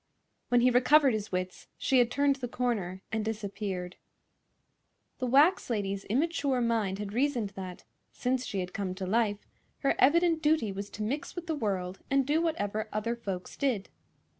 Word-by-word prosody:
When 245 0 +4
he 250 +1 +5
recovered 265 +2 +5
his 215 -1 -3
wits 185 0 -4
she 265 - +3
had 240 -1 +4
turned 280 +1 +2
the 255 -2 -4
corner 210 -7 -2
and 220 0 -1
disappeared. 200 -4 -4 1.2
The 255 - -1
wax 290 +9 +4
lady's 200 -3 -2
immature 280 +1 +1
mind 225 -5 0
had 205 0 -5
reasoned 245 -4 +1
that, 185 -2 -8 0.3
since 255 0 -1
she 200 -6 -2
had 180 0 -6
come 190 -2 -3
to 190 0 -4
life, 210 +1 0 0.4
her 275 - +3
evident 330 +3 +4
duty 300 -9 +2
was 200 +1 -5
to 210 - -5
mix 270 +8 -3
with 350 -1 -5
the 325 - -1
world 195 -8 -2
and 275 -1 +3
do 300 +4 +2
whatever 215 -10 -1
other 220 +3 -1
folks 195 -6 -5
did. 250 -9 -1
230 Hz, 170 wpm, -30 LUFS, 200-275 Hz, 1.2 s, he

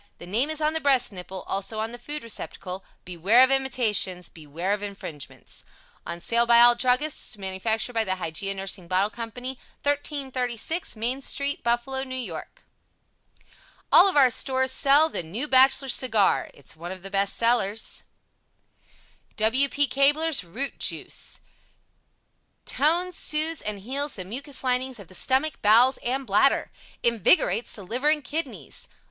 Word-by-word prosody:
The - - -10
name 225 +11 0
is 315 0 -2
on 305 +1 +1
the 320 - -1
breast 270 -5 +2
nipple; 185 0 -8
also, 200 +3 -3
on 220 +1 -2
the 240 - -8
food 295 +4 -6
receptacle. 190 -4 -6 0.2
Beware 185 +8 +4
of 260 - +3
imitations! 225 -9 +1
Beware 165 +5 -4
of 205 - -3
infringements! 195 -8 -7 0.4
On 170 +1 -5
sale 235 +6 +2
by 235 0 +7
all 240 0 +9
druggists. 250 +1 0
Manufactured 220 +5 -2
by 225 -1 +1
the 190 -3 -2
HYGEIA 190 +2 -3
NURSING 190 -2 -4
BOTTLE 190 +4 +1
CO. 235 - -9
1336 260 +3 -3
Main 240 +5 -2
St. 280 +1 -2
Buffalo, 240 +3 -1
N. 265 0 -5
Y. 235 -12 -4 1.5
All 395 - +8
of 365 - -1
our 260 -3 +6
stores 260 +1 0
sell 285 +4 +4
THE 315 - -4
NEW 205 - -4
BACHELOR 270 0 +5
CIGAR 225 -5 +2
It's 140 - -13
one 170 +2 -8
of 185 -1 -9
the 195 - -8
best 195 0 +1
sellers 230 -2 +1 1.3
W. 255 +6 +2
P. 290 +1 +2
Cabler's 285 - +2
ROOT 240 +11 -5
JUICE - - -2 1.3
(Compound) 320 +5 +2
TONES, - - -3
SOOTHES 310 +1 -1
and 210 -1 -4
HEALS 280 +7 -4
the 185 - -7
Mucous 270 +8 -6
Linings 255 0 -1
of 195 - -12
the - - -15
Stomach, 270 - 0
Bowels 235 +5 +5
and 265 +2 -3
Bladder, 215 +6 +2 0.3
INVIGORATES 230 -1 +2
the 205 - -9
Liver 245 +10 0
and 305 -1 +2
Kidneys. 315 +6 -5
240 Hz, 155 wpm, -25 LUFS, 195-270 Hz, 1.5 s, all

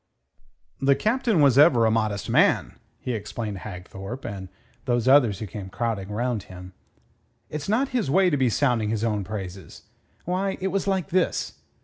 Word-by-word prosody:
"The 135 0 +4
Captain 225 - +1
was 140 -2 +5
ever 130 -7 +6
a 110 - +3
modest 110 -2 -1
man," - - +2 0.2
he 125 - -3
explained 105 -1 -5
to - - -8
Hagthorpe 95 +5 -8
and 95 -2 -6 0.4
those 120 -1 0
others 130 -7 +5
who 110 - -5
came 100 -1 -8
crowding 105 -3 -3
round 115 +1 -1
him. 90 0 -10 0.8
"It's 150 +3 -5
not 255 +6 +1
his 245 - -1
way 185 +4 +4
to - - +2
be 130 -2 +2
sounding 115 -3 +1
his 110 0 -1
own 105 -3 0
praises. 95 -4 -7 0.4
Why, 190 +2 -1
it 190 - -1
was 195 +1 -2
like 190 -5 0
this. 180 0 0
120 Hz, 170 wpm, -25 LUFS, 105-155 Hz, 0.8 s, ever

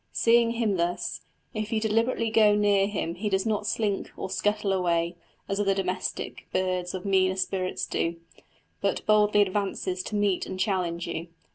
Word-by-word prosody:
Seeing 230 0 +4
him 225 -5 0
thus, 175 +1 -2 0.3
if 215 -1 -3
you 220 - +1
deliberately 225 +1 +1
go 215 -2 +5
near 205 -1 +3
him 190 -5 -2
he 205 +4 -3
does 190 0 +1
not 210 -1 0
slink 210 -2 -1
or 190 - -5
scuttle 210 +1 0
away, 170 -2 +1 0.3
as 195 +1 -1
other 195 -1 +2
domestic 185 -1 -3
birds 185 -1 -1
of 185 - -6
meaner 190 -1 +3
spirits 185 0 -1
do, 165 0 -1 0.7
but - - -1
boldly 210 -1 +5
advances 190 -2 -2
to 210 - -5
meet 205 -3 +1
and 185 - -6
challenge 180 -4 0
you. 170 0 -4
195 Hz, 165 wpm, -27 LUFS, 185-210 Hz, 0.7 s, go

